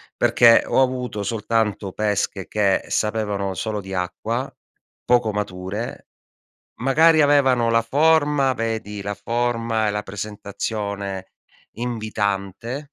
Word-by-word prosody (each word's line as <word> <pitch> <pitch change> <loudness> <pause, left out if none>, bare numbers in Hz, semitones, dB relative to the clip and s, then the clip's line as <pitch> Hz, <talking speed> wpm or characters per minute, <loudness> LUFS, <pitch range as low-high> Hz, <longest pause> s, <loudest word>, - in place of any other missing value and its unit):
Perché 115 -1 +5
ho - - +3
avuto 125 -5 -1
soltanto 105 -2 -1
pesche 105 -2 -1
che 100 -2 +1
sapevano 105 -3 -1
solo 105 +3 -3
di 95 0 -8
acqua, 90 -1 -3 0.5
poco 120 -3 +3
mature, 105 +3 -5 0.7
magari 155 +3 +5
avevano 135 -5 +3
la 115 0 +4
forma, 145 +1 +3
vedi 110 -3 -3
la 100 +1 -3
forma 115 -1 -1
e - - +2
la 105 0 -2
presentazione 100 -1 -5 0.4
invitante, 110 - -3
110 Hz, 105 wpm, -22 LUFS, 100-120 Hz, 0.7 s, Perché